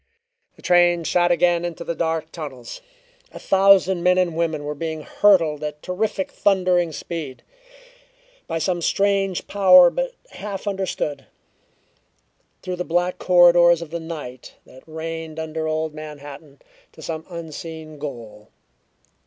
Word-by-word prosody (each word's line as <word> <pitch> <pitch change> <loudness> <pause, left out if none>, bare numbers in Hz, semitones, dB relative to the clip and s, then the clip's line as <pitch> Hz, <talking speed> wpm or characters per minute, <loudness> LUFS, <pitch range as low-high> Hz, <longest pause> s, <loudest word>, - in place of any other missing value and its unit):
The - - -20
train 175 -1 +4
shot 175 +1 +2
again 175 0 +2
into 170 -1 -5
the 170 - -3
dark 160 -1 -2
tunnels. 140 - -8 0.5
A - - -11
thousand 190 -2 +4
men 180 +1 +3
and 180 -3 +1
women 160 -3 -1
were 145 0 -4
being 160 +1 -5
hurtled 165 -8 +3
at 150 0 -6
terrific 195 +1 -2
thundering 180 -4 +1
speed, 155 -4 -7 1.0
by 165 - -2
some 175 +2 -1
strange 195 0 0
power 185 -3 +6
but - - -3 0.2
half 205 -1 -7
understood, 190 -8 -3 1.4
through 185 -1 -4
the 180 - -2
black 175 +1 -1
corridors 175 -1 +5
of 160 - -13
the 170 - -3
night 150 -7 -8
that 130 - -16
reigned 160 0 -6
under 160 0 -4
old 155 0 -2
Manhattan, 145 -2 -10 0.3
to - - -13
some 160 -1 -5
unseen 160 -2 -8
goal. 115 -7 -8
170 Hz, 135 wpm, -22 LUFS, 155-180 Hz, 1.4 s, power